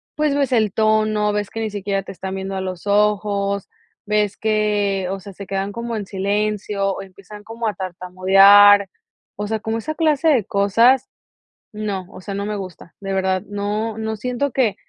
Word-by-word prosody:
pues 300 -2 +1
ves 280 -2 0
el 220 -5 +2
tono, 215 -1 +2
ves 205 -1 -2
que 225 - -5
ni 220 -1 -2
siquiera 200 -1 -2
te - - -9
están 190 0 -6
viendo 195 0 -4
a 190 - -2
los 185 +1 -6
ojos, 200 -1 +1 0.4
ves 210 -1 +1
que, 210 -3 0
o 195 - -4
sea, 200 +1 -10
se 200 +1 -9
quedan 195 +1 -3
como 235 +1 -4
en 205 -3 -4
silencio 200 0 -1
o - - -6
empiezan 200 +2 -13
como 225 +1 -4
a 210 - -2
tartamudear. 195 +2 +5 0.5
O 205 - -4
sea, 220 0 -2
como 220 +1 -3
esa 310 +7 -4
clase 315 -1 +1
de 255 -9 +3
cosas, 230 +7 +3 0.6
no. 205 -4 -4
O - - -11
sea, 200 +1 -6
no 200 +1 -3
me 210 - -3
gusta. 185 -3 -9
De 195 -1 -4
verdad, 190 -1 0
no 210 +2 -3
no 220 0 -3
siento 250 +5 -2
que 230 -6 +1
205 Hz, 190 wpm, -20 LUFS, 195-220 Hz, 0.6 s, tartamudear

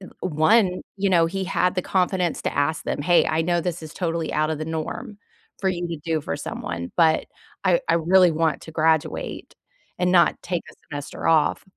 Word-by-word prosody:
th 185 - -11
one, 185 +4 +2 0.2
you 195 -1 0
know, 170 -2 +4
he 190 +3 -3
had 180 0 +1
the 185 - 0
confidence 180 -2 0
to - - -2
ask 150 +3 0
them, - - -2
"Hey, 175 +3 +4
I 160 +1 +1
know 175 +1 +1
this 175 -1 -3
is 155 -1 -9
totally 165 -3 -2
out 155 +1 +1
of 160 - -1
the 155 - -3
norm 200 +8 -5 0.4
for 195 - +1
you 175 -1 -3
to 165 -2 -4
do 165 -2 0
for - - -3
someone, 85 0 -5
but 160 -2 +3 0.4
I - - +3
I - - +4
really 180 +2 +5
want 160 -2 0
to - - -10
graduate 160 -1 -1 0.4
and 180 0 +1
not 175 -2 +4
take 175 -2 -2
a - - -18 0.2
semester 145 -1 -5
off." 160 -2 +3
170 Hz, 205 wpm, -23 LUFS, 160-180 Hz, 0.4 s, really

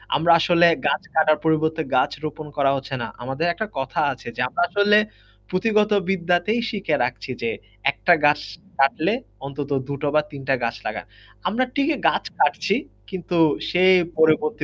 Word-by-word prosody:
আমরা 170 +3 +3
আসলে 175 0 +4 0.2
গাছ - - +1
কাটার 155 -1 +3
পরিবর্তে 160 0 +1
গাছ 130 - +2
রোপণ 155 0 -6
করা 135 -1 +3
হচ্ছে 135 0 -5
না। - - -3 0.2
আমাদের 135 +6 -2
একটা 220 +4 -4
কথা 135 -1 -3
আছে 125 - -14
যে - - -3
আমরা - - -2
আসলে 205 +2 +4 0.5
পুঁথিগত 210 +2 +1 0.2
বিদ্যাতেই 180 +4 +1
শিখে 195 -8 -1
রাখছি 125 +1 -4
যে 115 - -1 0.4
একটা 175 +4 +3
গাছ 145 0 +4 0.4
কাটলে 155 +8 +2 0.3
অন্তত 140 +1 -6 0.2
২ 140 - -4
টো 145 - -1
বা 150 - +5
৩ 140 - -8
টা - - +4
গাছ 115 0 -1
লাগান। 105 -1 -4 0.4
আমরা 225 +8 +1
ঠিকই 290 +2 +1
গাছ - - -2 0.2
কাটছি - - +2 0.3
কিন্তু 180 -2 -3 0.3
সে 180 +1 +2 0.3
পরবর্তী 155 -1 +2
160 Hz, 165 wpm, -22 LUFS, 140-185 Hz, 0.5 s, বা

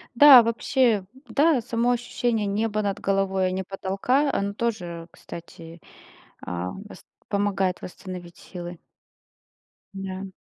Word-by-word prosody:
Да, 270 -1 +10
вообще, 230 -2 +1 0.2
да, 280 +2 +3
само 235 +2 +1
ощущение 240 -2 -1
неба 215 +1 0
над 200 -1 -2
головой, 195 -1 +1
а - - -2
не 190 +1 -2
потолка, 195 +10 0
оно 200 -4 -1
тоже, 180 -7 -3
кстати, 165 0 -11 0.6
а, 90 +1 -4
вост 205 +2 -11 0.2
помогает 200 -3 0
восстановить 180 -2 -9
силы. 175 -1 -8 1.2
Да. 190 0 -6
200 Hz, 115 wpm, -25 LUFS, 185-230 Hz, 1.2 s, Да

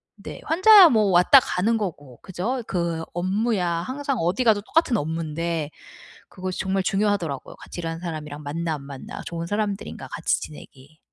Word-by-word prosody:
네, - - -9
환자야 375 +2 +8
뭐 220 -5 +3
왔다 180 +10 +7
가는 220 +1 0
거고 145 - -6
그죠? 205 +8 -3
그 170 -3 -2
업무야 190 +2 0
항상 260 +12 -2
어디 180 +9 0
가도 220 -4 +3
똑같은 260 +3 +1
업무인데 160 -1 -2 0.6
그것이 185 0 -5
정말 190 0 0
중요하더라고요. 195 -7 -1
같이 - - -9
일하는 165 -1 -4
사람이랑 155 -4 -6
맞나 160 +3 -3
안 145 - -7
맞나 140 -1 -9
좋은 170 0 -4
사람들인가 205 +1 -3
같이 - - -1
지내기. 145 0 -12
175 Hz, 365 characters per minute, -24 LUFS, 160-215 Hz, 0.6 s, 환자야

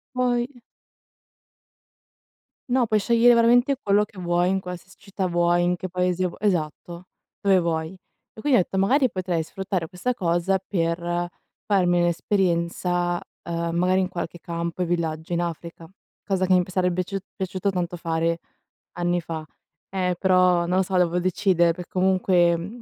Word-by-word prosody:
Voi 245 0 -1 2.1
No, 255 -1 +3
puoi 215 -1 +2
scegliere 235 +3 +5
veramente 240 +4 +4
quello 205 +1 +3
che 200 -2 -10
vuoi, 175 0 +1
in 190 - +1
qualsiasi 180 +1 -9
città 195 -1 -4
vuoi, 175 0 +2
in 175 +1 +2
che 185 +1 -6
paese 180 0 0
vu 175 - -9
esatto, 175 -2 -2 0.4
dove 195 -2 +4
vuoi. 160 -2 -1 0.4
E 220 - -12
quindi 275 -5 +4
ho - - +5
detto: 190 - -4
"Magari 255 +7 +3
potrei 180 -3 -2
sfruttare 180 0 -3
questa 185 +8 -2
cosa 185 -2 0
per 175 -1 -1 0.4
farmi 180 -4 +2
un'esperienza, 175 0 0 0.3
uhm, 170 0 -2
magari, 185 +2 +2
in 185 - 0
qualche 175 -1 -5
campo 170 +1 -3
e - - -1
villaggio 165 -1 -2
in 170 - +1
Africa", 170 -1 -6 0.3
cosa 190 -2 0
che 185 - +3
imb 180 -1 +3
sarebbe 180 -1 +1
biaciu 185 +2 -2 0.2
piaciuto 190 +1 -2
tanto 180 -1 -3
fare 165 0 -1 0.6
anni 175 0 +1
fa. 160 -1 -5 0.5
Eh, 180 -2 0
però 185 -2 +3
non 180 +1 +1
lo 190 - +3
so, 190 0 -4
devo 180 -1 +2
decidere, 180 -2 +2
perché 175 0 -9
comunque 185 -2 +3
mhmm 200 +8 -7
180 Hz, 160 wpm, -24 LUFS, 170-195 Hz, 2.1 s, scegliere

